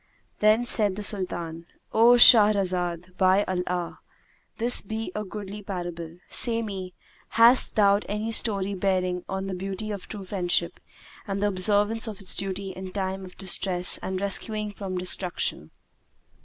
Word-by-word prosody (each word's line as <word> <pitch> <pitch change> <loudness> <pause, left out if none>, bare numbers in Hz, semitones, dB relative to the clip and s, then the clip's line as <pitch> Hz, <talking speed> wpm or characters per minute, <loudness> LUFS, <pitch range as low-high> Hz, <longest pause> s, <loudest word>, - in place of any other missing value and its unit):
Then 215 +3 +3
said 210 -5 +5
the 210 - -5
Sultan, 170 -5 -1 0.3
"O 230 +2 +5
Shahrazad, 185 -7 +5
by 190 +1 +3
Allah! 180 -2 -4 0.6
this 240 +2 +4
be 220 0 -6
a 210 - -4
goodly 205 0 -8
parable! 175 -4 -7
Say 230 -1 +2
me, 190 -4 -7 0.4
hast 235 +3 +4
thou 200 -2 +4
any 210 +2 -3
story 200 -3 +1
bearing 185 -2 -1
on 190 0 -4
the 195 - -5
beauty 195 +3 -6
of 200 -3 -7
true 205 -2 -8
friendship 175 -3 -1 0.5
and 195 0 -3
the 205 +1 +1
observance 205 +4 +2
of 215 -3 -7
its 195 - -6
duty 195 0 -3
in 185 0 -9
time 190 0 -4
of 180 -1 -13
distress 185 -1 -1
and 190 0 -5
rescuing 210 +2 -2
from 195 -2 -6
destruction?" 180 - -3
195 Hz, 145 wpm, -25 LUFS, 185-210 Hz, 0.6 s, said